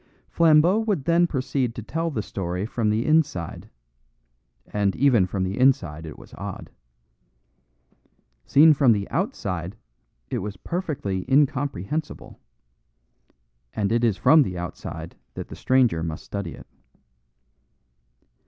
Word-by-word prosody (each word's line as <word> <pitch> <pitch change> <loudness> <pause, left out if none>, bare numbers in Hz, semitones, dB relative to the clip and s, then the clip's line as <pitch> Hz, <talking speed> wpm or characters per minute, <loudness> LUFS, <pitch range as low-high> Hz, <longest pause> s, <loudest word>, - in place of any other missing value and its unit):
Flambeau 165 +4 +5
would 205 -11 -1
then 170 +1 +3
proceed 130 -4 -2
to 115 - -6
tell 165 +8 -2
the 115 -9 -3
story 90 0 -4
from 115 -1 -1
the 110 +3 0
inside; 150 - 0 1.0
and 100 -2 -1
even 120 -8 +3
from 95 0 -2
the 95 +4 -3
inside 80 - +2
it 75 - -9
was - - -15
odd. - - -7 1.8
Seen 155 +3 +7
from 135 -5 +4
the 100 -2 -2
outside 90 +2 -3 0.6
it - - -1
was 100 0 -6
perfectly 145 - -3
incomprehensible, 145 - -1 1.4
and 105 -1 0
it 115 +1 +1
is 110 -5 +2
from 145 - +6
the 90 -10 -2
outside 85 -1 -7 0.2
that - - -7
the - - -8
stranger 125 -10 +2
must 80 -1 -5
study 100 -5 -5
it. - - -13
115 Hz, 125 wpm, -24 LUFS, 95-150 Hz, 1.8 s, Seen